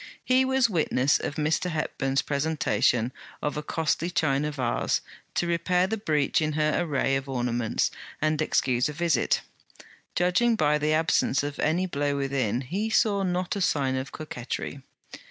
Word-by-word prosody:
He 255 +1 +4
was 265 -2 +3
witness 145 - +2
of 145 - -4
Mr. 155 +4 0
Hepburn's 135 -4 -1
presentation 140 -5 +1 0.3
of 150 - -2
a 150 - -2
costly 160 +2 -1
China 150 -4 +1
vase, 130 -5 0 0.3
to - - +1
repair 170 +2 +1
the 215 +4 -1
breach 155 -9 +1
in 155 0 0
her 155 0 +1
array 135 -4 0
of 135 0 -3
ornaments, 120 -3 0 0.3
and 155 0 +1
excuse 130 -4 +1
a - - -5
visit. 160 -5 +1 0.7
Judging 180 +7 +3
by 150 -5 +2
the 150 +1 +1
absence 155 -3 +2
of 145 0 -5
any 170 +5 +1
blow 145 -4 -1
within, 130 -4 0
he 195 - -2
saw 210 -3 +2
not 180 0 -1
a 200 - -2
sign 135 -7 +1
of 130 +1 -4
coquettry. 140 -2 -5
150 Hz, 155 wpm, -26 LUFS, 135-175 Hz, 0.7 s, He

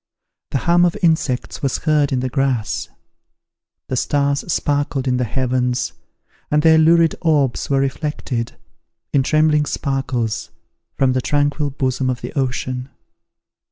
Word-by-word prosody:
The - - 0
hum 170 +5 +3
of 175 -1 +2
insects 160 -7 0
was 135 -2 0
heard 150 -3 +1
in 130 -2 0
the 130 - -2
grass. 130 -5 -1 1.0
The 130 - -2
stars 140 +2 +1
sparkled 145 -3 0
in 125 -1 +2
the 125 - +1
heavens, 125 +1 -1 0.6
and 150 0 +2
their 160 -1 +6
lurid 165 +1 +5
orbs 145 -7 +1
were 135 -1 +2
reflected, 135 -3 -3 0.6
in 140 - +4
trembling 150 +1 +2
sparkles, 130 -5 -2 0.5
from 130 -1 +2
the 130 - 0
tranquil 145 +2 0
bosom 130 -1 -1
of 125 -1 -2
the - - -6
ocean. 130 -2 -2
135 Hz, 135 wpm, -19 LUFS, 130-150 Hz, 1.0 s, their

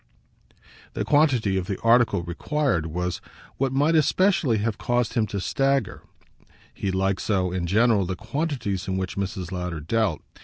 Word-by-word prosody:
The - - -2
quantity 130 -10 +3
of 90 - -5
the 100 - -3
article 115 -6 +3
required 90 - -1
was 90 +2 -3 0.4
what 135 -1 0
might 145 +4 +2
especially 160 - +3
have 105 0 -2
caused 120 -1 0
him 115 -4 +1
to 100 0 -4
stagger 135 +7 0 0.7
he 100 - -3
liked 95 0 0
so, 95 -4 0
in 90 -1 -2
general, 105 0 +3
the 95 - -2
quantities 110 - -3
in 95 0 -1
which 95 0 -3
Mrs. 95 -2 -4
Lowder 90 -3 -4
dealt. 95 +2 -1
105 Hz, 155 wpm, -24 LUFS, 90-130 Hz, 0.7 s, quantity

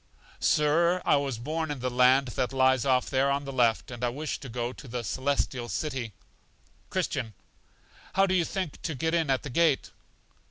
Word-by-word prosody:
Sir, 170 +4 +3
I - - +4
was 140 -4 -2
born 155 +6 -3
in 145 -3 -4
the 125 0 -2
land 130 +2 +4
that 125 +1 -2
lies 130 -1 +3
off 130 -2 +2
there 135 0 +2
on 140 +1 0
the 135 - -6
left, 120 -2 +2
and 120 0 -7
I 120 - +2
wish 145 +5 -4
to 135 - -9
go 120 +1 -3
to 140 - -12
The 120 0 -4
Celestial 130 +1 -1
City. 130 -7 -3 0.8
Christian. 110 -6 -2 0.8
How 195 - +4
do 185 - 0
you 180 -2 +3
think 185 -2 -4
to 160 - -3
get 160 +5 -1
in 165 -4 +1
at 135 -1 +1
the 145 - -6
gate? 160 -1 +2
135 Hz, 195 wpm, -28 LUFS, 125-150 Hz, 0.8 s, I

